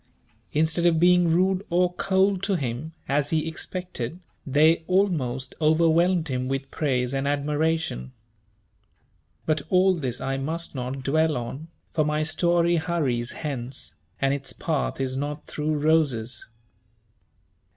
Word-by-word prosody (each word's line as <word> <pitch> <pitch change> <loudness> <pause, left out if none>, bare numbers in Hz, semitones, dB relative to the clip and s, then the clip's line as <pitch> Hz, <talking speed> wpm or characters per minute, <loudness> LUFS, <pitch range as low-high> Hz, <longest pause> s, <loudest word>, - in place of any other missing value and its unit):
Instead 160 +3 +2
of 165 -2 +3
being 180 0 +5
rude 185 +3 +2
or 180 +1 +2
cold 190 +1 +2
to 195 0 0
him, 135 +1 -3 0.2
as 145 +1 +1
he 160 0 0
expected, 170 -3 -5 0.3
they 155 +4 +4
almost 145 -10 0
overwhelmed 165 +2 +3
him 130 -2 -2
with 135 0 -3
praise 125 -4 0
and 135 +1 -1
admiration. 145 - -1 1.3
But 155 -2 +1
all 185 +1 +4
this 130 -8 -3
I 135 0 -2
must 160 +5 -4
not 130 0 -4
dwell 155 +2 +2
on, 130 +6 -6 0.3
for 155 - +2
my 150 +1 0
story 170 +2 +2
hurries 145 -8 0
hence, 135 -4 -5 0.3
and 135 0 +2
its 140 -1 -4
path - - -2
is 130 -1 -1
not 145 +2 -4
through 150 0 -2
roses. 140 -7 +1
155 Hz, 130 wpm, -25 LUFS, 135-170 Hz, 1.3 s, being